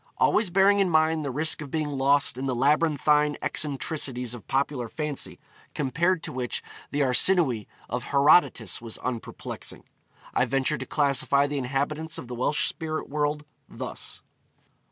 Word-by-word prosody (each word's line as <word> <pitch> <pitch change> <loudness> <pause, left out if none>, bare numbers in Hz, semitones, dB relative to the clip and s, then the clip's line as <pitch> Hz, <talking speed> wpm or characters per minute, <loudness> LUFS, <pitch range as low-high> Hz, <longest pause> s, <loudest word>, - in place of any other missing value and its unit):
Always 215 -3 +3
bearing 195 +3 +4
in 195 -2 +3
mind 160 -1 +2
the 140 - -2
risk 155 +5 +1
of 145 - -7
being 155 0 -1
lost 140 -1 +2
in 130 +2 -4
the 130 - 0
labyrinthine 150 +2 +3
eccentricities 135 -4 -2
of 120 - -10
popular 135 -3 -1
fancy, 150 0 -4 0.4
compared 165 +5 +1
to - - -5
which 125 -1 -3 0.3
the 145 - -1
Arsinoë 130 - +3 0.2
of 120 +1 -4
Herodotus 140 - +3
was 115 -2 -6
unperplexing, 120 -3 -6 0.5
I - - +3
venture 135 +4 0
to - - -6
classify 140 -1 +2
the 145 0 -2
inhabitants 145 +5 -2
of 125 - -8
the 125 - -6
Welsh 130 +5 +1
spirit 155 -1 -4
world 150 +1 -1 0.2
thus: - - -6
1. - - -43
145 Hz, 155 wpm, -26 LUFS, 130-155 Hz, 0.5 s, bearing